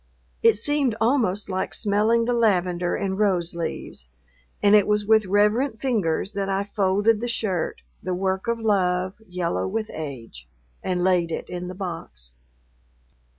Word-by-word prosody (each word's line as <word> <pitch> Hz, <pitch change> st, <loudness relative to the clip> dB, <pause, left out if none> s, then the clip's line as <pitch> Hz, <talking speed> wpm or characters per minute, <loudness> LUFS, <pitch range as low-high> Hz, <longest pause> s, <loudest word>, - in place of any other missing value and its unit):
It 455 Hz, -1 st, +5 dB
seemed 290 Hz, -6 st, +1 dB
almost 225 Hz, -5 st, +1 dB
like 190 Hz, -1 st, -2 dB
smelling 220 Hz, +2 st, +2 dB
the 245 Hz, -, +1 dB
lavender 180 Hz, -6 st, +1 dB
and 195 Hz, 0 st, -2 dB
rose 185 Hz, -5 st, +1 dB
leaves, 165 Hz, -, -5 dB, 0.6 s
and 205 Hz, -, +5 dB
it 205 Hz, -2 st, +5 dB
was 210 Hz, 0 st, +1 dB
with 220 Hz, -1 st, +4 dB
reverent 210 Hz, +6 st, +2 dB
fingers 205 Hz, -7 st, 0 dB
that 195 Hz, -1 st, -2 dB
I 195 Hz, +1 st, 0 dB
folded 205 Hz, +2 st, +1 dB
the 240 Hz, -, -2 dB
shirt, 205 Hz, -7 st, -2 dB, 0.2 s
the 185 Hz, -1 st, -2 dB
work 190 Hz, +2 st, -1 dB
of 235 Hz, 0 st, 0 dB
love, 185 Hz, -4 st, +1 dB, 0.2 s
yellow 180 Hz, -1 st, -1 dB
with 215 Hz, +2 st, -3 dB
age, 120 Hz, -, -8 dB, 0.3 s
and 180 Hz, -1 st, -1 dB
laid 180 Hz, -2 st, +2 dB
it 165 Hz, -, -4 dB
in 180 Hz, 0 st, -5 dB
the 185 Hz, -, -7 dB
box.... 165 Hz, -, -7 dB
195 Hz, 150 wpm, -24 LUFS, 180-220 Hz, 0.6 s, It